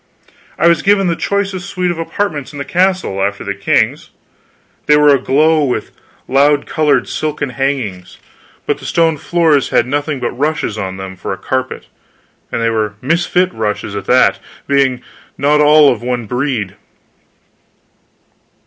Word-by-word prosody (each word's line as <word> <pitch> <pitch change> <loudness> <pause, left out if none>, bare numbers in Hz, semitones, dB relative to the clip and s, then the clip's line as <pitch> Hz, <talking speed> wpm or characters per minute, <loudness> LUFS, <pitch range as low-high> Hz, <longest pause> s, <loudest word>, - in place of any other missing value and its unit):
I - - +1
was 170 0 +3
given 200 -1 +3
the 170 -2 +1
choicest 195 0 -2
suite 180 -2 -1
of 170 - -5
apartments 165 -5 -3
in 145 - -10
the 140 - -4
castle, 185 - 0
after 100 +1 -1
the 100 - -3
king's. 100 0 0 0.8
They 150 - +6
were 150 -1 +5
aglow 150 +4 +2
with 125 -3 -2 0.4
loud 145 +2 +3
colored 155 -2 +1
silken 150 -2 -3
hangings, 120 -9 -3 0.5
but - - -1
the - - -11
stone 165 -2 +1
floors 155 -2 +1
had 120 - +2
nothing 145 +2 -2
but 120 - -2
rushes 145 -4 -2
on 95 -3 -4
them 95 0 -7
for 90 - -5
a - - -6
carpet, 130 +6 -3 0.7
and - - -2
they 115 - +2
were 105 -2 -1
misfit 175 +6 +1
rushes 105 -2 -3
at 100 -2 -5
that, 125 +4 +3 0.3
being 135 -3 +1 0.3
not 150 +2 +3
all 150 -1 +6
of 120 - -9
one 120 -1 -2
breed. 125 -4 -2
140 Hz, 155 wpm, -15 LUFS, 120-160 Hz, 0.8 s, They